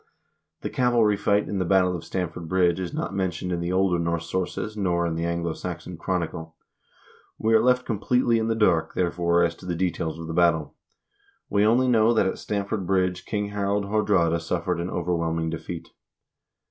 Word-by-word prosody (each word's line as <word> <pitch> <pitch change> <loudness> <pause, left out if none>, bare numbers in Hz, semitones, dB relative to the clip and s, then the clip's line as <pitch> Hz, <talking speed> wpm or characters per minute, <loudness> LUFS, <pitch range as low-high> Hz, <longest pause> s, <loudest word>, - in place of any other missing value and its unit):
The - - -3
cavalry 120 -4 +3
fight 100 +1 +1
in 100 - -2
the - - +1
battle 90 0 +3
of 85 - -6
Stamford 85 -2 -4
Bridge 90 -2 +2
is 90 -2 -3
not - - -3
mentioned 90 -2 -2
in 85 - -1
the 85 +1 -2
older 95 -2 +2
Norse 85 0 -1
sources,1 100 +3 -3
nor 85 -2 +1
in 85 - -1
the 85 +1 -2
"Anglo 85 -1 -1
Saxon 90 0 -6
Chronicle." 80 -2 -3 0.8
We 110 +1 +1
are 110 - +6
left 125 +1 +3
completely 115 +2 +1
in 110 - -1
the 115 - +1
dark, 85 -7 +2
therefore, 85 -1 +2
as 85 -1 +1
to 90 - -11
the 90 - -1
details 85 -2 -2
of 85 - -7
the 80 - -5
battle. 85 -3 +2 0.8
We 100 0 +3
only 120 +4 +4
know 115 -1 +4
that 110 - +3
at 95 - -2
Stamford 100 -2 -3
Bridge 90 -1 0
King 105 -1 -2
Harald 100 0 -1
Haardraade 95 -5 +2
suffered 85 +1 -2
an 85 +2 -3
overwhelming 85 -2 -1
defeat. 80 +1 -6
90 Hz, 185 wpm, -25 LUFS, 85-105 Hz, 0.8 s, are